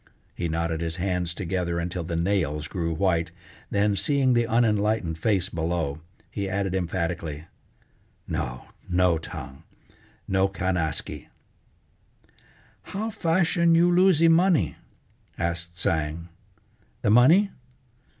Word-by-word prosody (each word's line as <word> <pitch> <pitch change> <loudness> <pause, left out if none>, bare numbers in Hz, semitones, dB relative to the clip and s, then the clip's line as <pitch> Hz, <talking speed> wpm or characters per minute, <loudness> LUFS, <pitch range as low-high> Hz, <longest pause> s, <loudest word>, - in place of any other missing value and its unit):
He 85 - -3
knotted 80 0 -1
his 80 -1 -2
hands 90 -1 -1
together 90 -2 -2
until 90 +1 -3
the 85 0 -4
nails 80 -4 0
grew 85 -1 -2
white 85 -1 +1 0.4
then, 100 0 +2
seeing 135 +3 +2
the 120 -1 +2
unenlightened 105 -7 +1
face 100 -1 +1
below, 80 -3 -2 0.3
he 100 -2 -3
added 95 -1 -1
emphatically: 85 -4 -3 0.8
"No, - - -4 0.2
no, 90 -2 +3
Tsang, 70 -3 -8 0.7
no 95 0 +2
can 95 -1 -2
askee!" 80 -4 -3 1.5
"How 215 +3 -4
fashion 170 -3 +2
you 175 +1 +4
losee 175 -2 +5
money!" 165 - +3 0.6
asked 85 0 -3
Tsang. 80 0 -1 0.7
"The - - +3
money? 160 - +6
90 Hz, 110 wpm, -25 LUFS, 85-115 Hz, 1.5 s, money